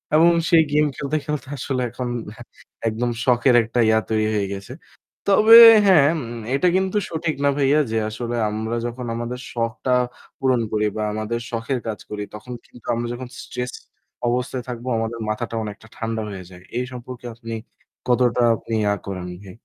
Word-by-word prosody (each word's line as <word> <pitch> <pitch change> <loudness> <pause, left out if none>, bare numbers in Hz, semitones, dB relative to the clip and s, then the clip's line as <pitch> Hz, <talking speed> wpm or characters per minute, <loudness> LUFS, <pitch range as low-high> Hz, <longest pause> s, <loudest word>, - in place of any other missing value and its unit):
এবং 165 +2 +7 0.2
সেই 165 -2 +6
game 150 0 +3
খেলতে, 140 +2 -3
খেলতে 150 -2 -3
আসলে 130 0 -2
এখন 125 +1 -5 0.8
একদম 115 +2 -1 0.2
শখের 125 0 +4
একটা 115 +2 -2
ইয়া 110 0 +4
তৈরি 110 -1 +1
হয়ে 100 -2 0
গেছে। 95 0 -9 0.6
তবে 220 +3 +9 0.3
হ্যাঁ, 170 -8 +6
উম 120 -3 -6 0.2
এটা 180 +6 +2
কিন্তু 190 +2 +1
সঠিক 160 -1 -2
না 140 - +4
ভাইয়া 145 +1 +3
যে 115 - 0
আসলে 120 +2 -4
আমরা 110 +2 -3
যখন 120 +1 -5
আমাদের 120 +2 -4
শখটা 115 +2 -1 0.5
পূরণ 130 -2 +2
করি 105 0 +1
বা 110 - -1
আমাদের 110 +2 -2
শখের 120 +3 -2
কাজ 110 - -3
করি 105 -1 -4
তখন 125 +4 -8
কিন্তু 120 - -17
আমরা 120 0 -2
যখন 125 +1 -6
stress 125 0 -5 0.5
অবস্থায় 125 +1 -1
থাকবো 120 +1 -6
আমাদের 115 +1 -3
মাথাটা 115 +2 -3
অনেকটা 110 +1 -8
ঠান্ডা 115 0 -2
হয়ে 95 -2 -7
যায়। 90 -1 -14
এই 125 - 0
সম্পর্কে 125 0 -9
আপনি 115 0 -7 0.5
কতটা 125 -1 +3
আপনি 115 - -7
ইয়া 105 -1 +2
করেন 95 -2 -5 0.2
ভাই? 95 -2 -11
120 Hz, 170 wpm, -22 LUFS, 110-130 Hz, 0.8 s, তবে